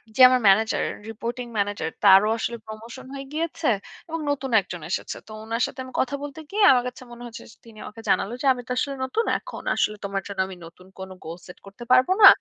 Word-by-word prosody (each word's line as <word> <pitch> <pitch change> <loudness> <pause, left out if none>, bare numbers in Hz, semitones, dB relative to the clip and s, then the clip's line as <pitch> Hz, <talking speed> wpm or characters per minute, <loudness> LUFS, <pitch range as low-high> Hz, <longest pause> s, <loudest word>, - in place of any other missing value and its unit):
যে 260 - +2
আমার 255 -1 +3
manager 220 +3 +4 0.3
reporting 235 +3 -5
manager 200 -4 -1 0.2
তারও 195 +2 +7
আসলে 235 +1 -3
প্রমোশন 230 +4 -9
হয়ে 275 0 -6
গিয়েছে 330 0 -2 0.4
এবং 330 0 -3
নতুন 270 -2 -3
একজন 175 -2 -8
এসেছে - - -3
তো - - -12
উনার 230 +2 -1
সাথে 260 - -11
আমি 255 - -12
কথা 265 +2 -1
বলতে 290 +2 -7
গিয়ে 420 0 +2
আমার 250 -1 +4
কাছে 250 +1 -8
মনে 240 0 -10
হয়েছে 235 0 -9
স - - -18
তিনি 225 -2 -15
আমাকে 225 +1 -10
জানালো 220 - +1
যে, - - -3
"আমি 250 - -7
তো - - -6
আসলে 275 +1 -1
নতুন 450 - -1
এখন - - -9
আসলে 210 - 0
তোমার 195 0 -2
জন্য 200 -1 -7
আমি 190 - -8
নতুন 180 +2 -15
কোন 190 0 -7 0.2
গোল 165 +2 -6
সেট 180 - -11
করতে 200 +5 -11
পারব 255 0 +6 0.2
না - - +14
235 Hz, 220 wpm, -24 LUFS, 200-260 Hz, 0.4 s, না